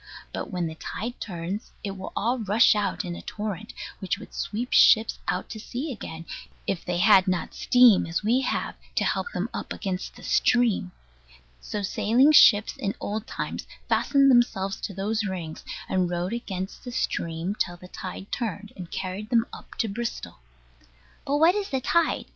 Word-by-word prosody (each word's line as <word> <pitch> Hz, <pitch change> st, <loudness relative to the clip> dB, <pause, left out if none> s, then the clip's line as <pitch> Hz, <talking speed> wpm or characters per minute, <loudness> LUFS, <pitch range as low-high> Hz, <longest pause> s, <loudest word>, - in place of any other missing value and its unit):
But -, -, -4 dB
when 180 Hz, -3 st, -2 dB
the 160 Hz, -, -4 dB
tide 230 Hz, +8 st, -6 dB
turns, 185 Hz, +3 st, -5 dB
it 200 Hz, -, -2 dB
will 190 Hz, 0 st, -7 dB
all 240 Hz, +4 st, 0 dB
rush 220 Hz, +2 st, +5 dB
out 210 Hz, -1 st, -1 dB
in 175 Hz, -1 st, -4 dB
a -, -, -8 dB
torrent 210 Hz, 0 st, -5 dB, 0.3 s
which 200 Hz, +2 st, -1 dB
would 225 Hz, -, -12 dB
sweep 235 Hz, +4 st, -3 dB
ships 220 Hz, 0 st, +6 dB
out 180 Hz, +1 st, -1 dB
to 220 Hz, -, -6 dB
sea 260 Hz, +7 st, -4 dB
again, 165 Hz, -8 st, -7 dB, 0.4 s
if 190 Hz, -, -2 dB
they 180 Hz, -1 st, -2 dB
had 195 Hz, 0 st, +6 dB
not 185 Hz, -1 st, -1 dB
steam, 245 Hz, -8 st, +5 dB
as 165 Hz, +5 st, -2 dB
we 240 Hz, +5 st, +3 dB
have, -, -, -1 dB, 0.2 s
to -, -, +2 dB
help 475 Hz, -, -1 dB
them -, -, -2 dB
up -, -, -5 dB
against 185 Hz, -2 st, -4 dB
the -, -, -13 dB
stream. 235 Hz, -7 st, +2 dB, 0.7 s
So 210 Hz, -1 st, -4 dB
sailing 240 Hz, +9 st, +4 dB
ships, 215 Hz, -8 st, +7 dB
in 200 Hz, -, -2 dB
old 215 Hz, +2 st, -4 dB
times, -, -, -4 dB, 0.2 s
fastened 275 Hz, -1 st, +4 dB
themselves 195 Hz, -6 st, +2 dB
to 200 Hz, -, -4 dB
those 215 Hz, +3 st, -1 dB
rings, 180 Hz, -5 st, -5 dB, 0.2 s
and 185 Hz, -2 st, +1 dB
rode 175 Hz, +3 st, -2 dB
against 195 Hz, -5 st, -5 dB
the 250 Hz, -, -6 dB
stream 170 Hz, -5 st, -2 dB
till 175 Hz, -4 st, -2 dB
the 180 Hz, -, -12 dB
tide 185 Hz, +1 st, -8 dB
turned, 210 Hz, -3 st, -4 dB
and 180 Hz, -3 st, -8 dB
carried 190 Hz, +3 st, -4 dB
them 230 Hz, -1 st, +3 dB
up -, -, -11 dB
to 225 Hz, -, 0 dB
Bristol. 230 Hz, -, -5 dB, 0.9 s
But 285 Hz, +1 st, +2 dB
what 325 Hz, +4 st, +6 dB
is 410 Hz, -1 st, -2 dB
the 265 Hz, -, 0 dB
tide? 330 Hz, +5 st, +1 dB
210 Hz, 180 wpm, -26 LUFS, 185-235 Hz, 0.9 s, ships